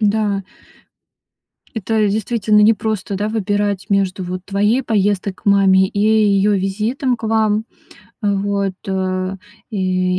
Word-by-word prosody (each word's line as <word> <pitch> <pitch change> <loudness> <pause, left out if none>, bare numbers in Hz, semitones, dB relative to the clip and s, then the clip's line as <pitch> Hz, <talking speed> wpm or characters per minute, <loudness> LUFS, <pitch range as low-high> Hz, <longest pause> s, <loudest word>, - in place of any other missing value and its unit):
Да. 205 -1 +1 1.3
Это 220 0 0
действительно 210 0 +1
непросто, 215 -2 +1
да, 205 +2 -1
выбирать 205 -2 -1
между 195 -1 0
вот 180 +1 -5
твоей 210 +6 +1
поездкой 205 -3 0
к - - -25
маме, 195 -1 +5
и 200 +1 -4
её 210 -1 +3
визитом 215 +7 -1
к 225 - -19
вам. 220 -1 +1 0.6
Э, 205 -1 +1
вот, 200 -1 -1 1.0
и 185 -3 0
205 Hz, 120 wpm, -18 LUFS, 195-215 Hz, 1.3 s, маме